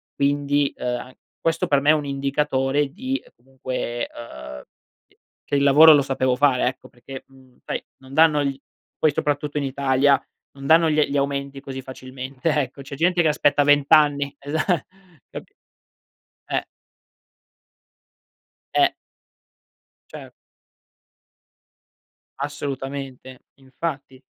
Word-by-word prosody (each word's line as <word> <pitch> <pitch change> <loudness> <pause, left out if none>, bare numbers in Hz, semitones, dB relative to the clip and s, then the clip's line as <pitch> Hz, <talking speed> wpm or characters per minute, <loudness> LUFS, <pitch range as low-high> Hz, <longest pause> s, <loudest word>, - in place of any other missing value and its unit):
Quindi, 145 0 +1
uhm, - - -6
a 125 +1 -4 0.3
questo 165 0 0
per 140 -1 +3
me 145 - +2
è 155 - +8
un 150 -2 -1
indicatore 140 0 0
di, 260 +2 -2
ehm, - - -22
comunque, 125 -1 -5
ehm, 65 - -10
uhm, - - -11 0.4
che - - -32 0.3
che - - -1
il 140 - +2
lavoro 150 +3 +8
lo 145 - +5
sapevo 130 -2 0
fare, 130 -2 +3
ecco; 130 +1 -5
perché, 135 +2 -11
mhmm, 130 -2 -21
sai, - - -4
non 130 0 -15
danno 155 -1 +4
gli 140 -1 -2 0.4
poi 155 - +3
soprattutto 145 0 -2
in - - -2
Italia, 135 0 +2 0.3
non 135 0 -11
danno 165 +2 +5
gli 155 0 +2
gli 140 - -2
aumenti 140 0 -2
così 135 -1 -7
facilmente, 130 +3 -6
ecco. 140 -2 -1
C'è 140 +1 -8
gente 175 +4 +2
che 160 - +3
aspetta 145 -1 +3
20, 145 0 +4
esa 145 +3 -2 0.7
capi - - -10 1.0
eh. - - -1 2.1
Eh. - - +4 1.2
Cer - - -10 2.1
Assolutamente, 135 -2 -6 0.2
infatti. 135 0 -6
140 Hz, 130 wpm, -22 LUFS, 130-145 Hz, 2.1 s, è